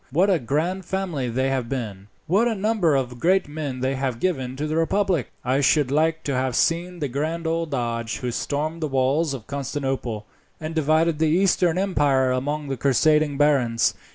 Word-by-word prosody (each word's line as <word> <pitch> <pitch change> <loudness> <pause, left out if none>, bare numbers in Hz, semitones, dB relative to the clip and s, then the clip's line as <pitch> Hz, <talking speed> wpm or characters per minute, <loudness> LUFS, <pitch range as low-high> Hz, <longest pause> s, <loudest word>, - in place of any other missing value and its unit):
What 180 +9 +3
a 180 - +3
grand 160 +9 -1
family 175 -10 -2
they 130 +3 0
have 130 -3 -2
been, 105 -7 -5 0.2
what 200 +8 +3
a 230 - 0
number 200 -6 +1
of 125 -2 -2
great 185 +3 +2
men 145 -4 -5
they 130 +1 0
have 130 -3 -2
given 130 -8 -1
to 145 +3 -3
the 155 +1 -2
republic! 175 - +1
I 130 +2 +2
should 140 0 +3
like 160 +2 +1
to 140 - -2
have 130 -1 0
seen 175 +4 +1
the 150 -4 -2
grand 155 +6 -3
old 165 0 -1
Doge 115 -4 -2
who 125 -1 -3
stormed 155 +6 -3
the 155 - 0
walls 135 +3 +1
of 115 -5 -9
Constantinople, 135 -6 -3 0.3
and 155 +1 -5
divided 160 +1 +2
the 160 -1 +3
Eastern 180 0 +2
empire 145 -9 +2
among 145 +3 -2
the 135 -1 -3
crusading 145 +3 +2
barons. 135 -6 +2
145 Hz, 185 wpm, -23 LUFS, 130-165 Hz, 0.3 s, What